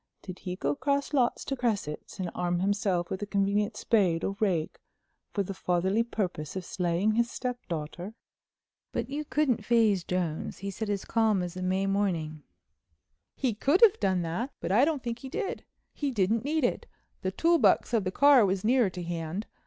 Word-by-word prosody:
Did 185 -1 -8
he 180 -1 -5
go 145 -5 -1
across 280 - -1
lots 255 -4 +1
to 275 - -2
Cresset's 215 - -3
and 180 -2 -3
arm 175 0 -1
himself 190 -2 0
with 190 - -3
a 205 - -3
convenient 205 +1 0
spade 185 -7 +2
or 195 - -1
rake 180 -7 0 0.5
for 200 - 0
the 195 - -5
fatherly 190 +4 +1
purpose 190 -10 -3
of 185 -2 -4
slaying 180 +2 0
his 235 +2 +1
stepdaughter?" 185 - -5 0.8
But - - -3
you 295 +2 -2
couldn't 285 -7 0
phase 215 -5 +3
Jones, 175 -4 -2
he 200 +2 -5
said 215 +2 -4
as 200 -2 -2
calm 220 -5 +2
as 175 0 -5
a 185 - -5
May 190 +1 0
morning: 175 -6 -1 0.9
"He 255 -4 0
could 280 - +2
have 445 -2 +7
done 185 -2 +1
that. 175 +11 -2
But - - -3
I 235 +8 +5
don't 305 -4 -1
think 235 -1 -3
he 265 - -8
did. 390 - -4 0.3
He 290 - -2
didn't 220 -1 +1
need 305 +2 0
it. 245 - 0 0.3
The 185 - -1
tool 335 - +3
box - - +3
of 225 -4 +3
the 185 - -1
car 280 +2 +6
was 190 -1 0
nearer 240 -1 +3
to 180 -1 -6
hand. 170 +4 -4
200 Hz, 190 wpm, -28 LUFS, 180-240 Hz, 0.9 s, have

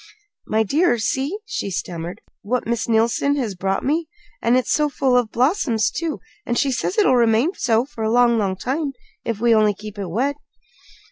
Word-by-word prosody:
"My 220 +1 +2
dear, 295 - +2
see," 265 - -1
she 200 - -3
stammered, 175 +1 -5 0.2
"what 245 +5 -1
Miss 230 0 -2
Neilson 230 +5 +2
has 240 -8 -2
brought 195 +1 -2
me. 315 +4 0 0.3
And 240 +2 +3
it's 255 - -1
so 300 -1 +2
full 265 -2 +1
of 245 -3 +2
blossoms, 245 - +1
too! 330 -2 -3 0.2
And 240 - -2
she 280 -2 +2
says 315 - -2
it'll 405 -12 +4
remain 235 - +3
so 235 - +1
for 235 -5 -7
a 220 - +1
long, 240 -1 +4
long 195 -3 0
time 275 - -2 0.3
if 230 -3 -3
we'll 230 -1 +4
only 210 -1 +3
keep 210 0 -9
it 195 - -3
wet." 265 +10 -1
235 Hz, 190 wpm, -21 LUFS, 215-275 Hz, 0.3 s, it'll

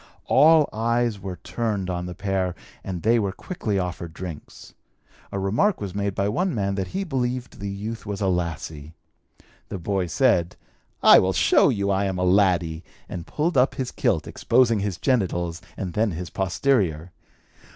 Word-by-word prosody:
All 155 +1 +6
eyes 115 -1 0
were 95 -1 -5
turned 100 +2 -3
on 90 -1 -3
the 90 - -7
pair 95 -2 -1 0.3
and 90 -3 -5
they 115 +2 +4
were 100 -3 0
quickly 110 - -3
offered 85 -3 -4
drinks. 90 -5 -9 0.6
A - - -3
remark 110 - +1
was 100 -3 -5
made 100 -1 -2
by 100 - 0
one 175 - 0
man 100 -2 0
that 95 -1 -2
he 195 +1 -3
believed 125 -6 -3
the 100 0 -4
youth 105 +3 -5
was 100 -1 -3
a 100 - 0
lassie. 80 -4 -3 0.8
The - - -4
boy 95 +1 -1
said, 90 - +2 0.5
'I - - +9
will 95 +1 +1
show - - +4
you 100 -1 0
I 100 +1 +1
am 95 -1 -2
a 90 - 0
laddie,' 90 -4 +2 0.2
and 85 -2 -7
pulled 160 +1 -1
up 130 - +2
his 130 -2 -3
kilt, - - 0
exposing 120 -2 +2
his 100 -3 -2
genitals 90 -9 0 0.2
and 90 -3 -4
then 110 +1 +1
his 90 +2 -6
posterior. 95 - 0
100 Hz, 170 wpm, -24 LUFS, 90-115 Hz, 0.8 s, I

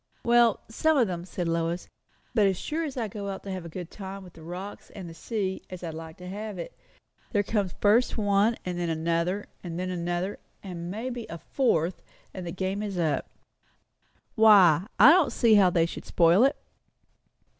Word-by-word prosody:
"Well, 235 -2 +4
some 315 +7 +1
of 250 - +5
them," 175 -3 -4
said 180 -2 -4
Lois. 165 +1 -1 0.5
"But 215 -4 +4
as 190 -2 0
sure 315 - -3
as 285 -4 -5
I 230 -3 -1
go 200 0 -6
out 195 - -6
to 195 - -6
have 185 -2 -5
a - - -7
good 175 +1 -7
time 195 -1 -8
with 180 -2 -14
the 165 - -14
rocks 180 +5 -8
and 190 -4 -9
the 165 - -9
sea, 190 +2 -3
as 185 -1 -8
I 165 - -4
like 160 0 -9
to 180 - -10
have 205 +1 -6
it, 170 - -7 0.6
there 205 -2 +3
comes 200 -4 -1
first 220 +5 +3
one 205 +2 +2
and 180 -1 -3
then 175 -1 -1
another 170 +4 -1 0.2
and 170 -2 -5
then 185 0 -2
another, 175 +2 -2 0.2
and 175 -3 -6
maybe 235 +4 -5
a 170 - -6
fourth; 175 - 0 0.3
and 185 -2 -6
the - - -3
game 190 +2 -2
is 205 -3 -4
up." 160 -4 0 1.0
"Why? 200 -6 +6
I 250 +8 +9
don't 345 -3 +4
see 230 -3 +3
how 200 -3 +6
they 170 -2 +2
should 170 - -7
spoil 175 +7 +4
it." 275 - +2
190 Hz, 200 wpm, -27 LUFS, 175-215 Hz, 1.0 s, I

